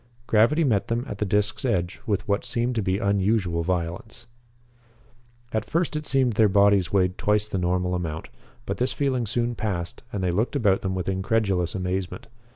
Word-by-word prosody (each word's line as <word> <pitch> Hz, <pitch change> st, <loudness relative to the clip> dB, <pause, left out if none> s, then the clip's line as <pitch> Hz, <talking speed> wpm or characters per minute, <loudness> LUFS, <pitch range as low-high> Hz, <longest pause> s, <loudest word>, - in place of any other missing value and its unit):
Gravity 120 Hz, +10 st, +3 dB
met 110 Hz, -9 st, +1 dB
them 120 Hz, +2 st, -1 dB
at 105 Hz, -, -6 dB
the 105 Hz, -, 0 dB
disc's 105 Hz, +1 st, 0 dB
edge 90 Hz, -1 st, -1 dB
with 105 Hz, 0 st, -1 dB
what 100 Hz, 0 st, 0 dB
seemed 120 Hz, 0 st, -1 dB
to 115 Hz, -, 0 dB
be 95 Hz, -1 st, 0 dB
unusual 100 Hz, -3 st, +1 dB
violence. 90 Hz, +6 st, -3 dB, 1.3 s
At 110 Hz, -1 st, 0 dB
first 160 Hz, -, -1 dB
it 150 Hz, 0 st, -2 dB
seemed 130 Hz, -3 st, +2 dB
that -, -, -11 dB
their 110 Hz, -2 st, +5 dB
bodies 100 Hz, -2 st, +4 dB
weighed 90 Hz, -2 st, +1 dB
twice 105 Hz, 0 st, +2 dB
the 100 Hz, -3 st, -3 dB
normal 90 Hz, 0 st, 0 dB
amount, 80 Hz, -3 st, -4 dB, 0.4 s
but -, -, -3 dB
this 125 Hz, +1 st, 0 dB
feeling 130 Hz, -5 st, 0 dB
soon 120 Hz, +3 st, 0 dB
passed 95 Hz, -6 st, -3 dB
and 100 Hz, -2 st, -3 dB
they 90 Hz, -, +1 dB
looked 110 Hz, +10 st, 0 dB
about 105 Hz, -8 st, +2 dB
them 95 Hz, -1 st, -2 dB
with 90 Hz, -, -3 dB
incredulous 95 Hz, -2 st, 0 dB
amazement. 95 Hz, +4 st, -3 dB
100 Hz, 185 wpm, -25 LUFS, 90-115 Hz, 1.3 s, their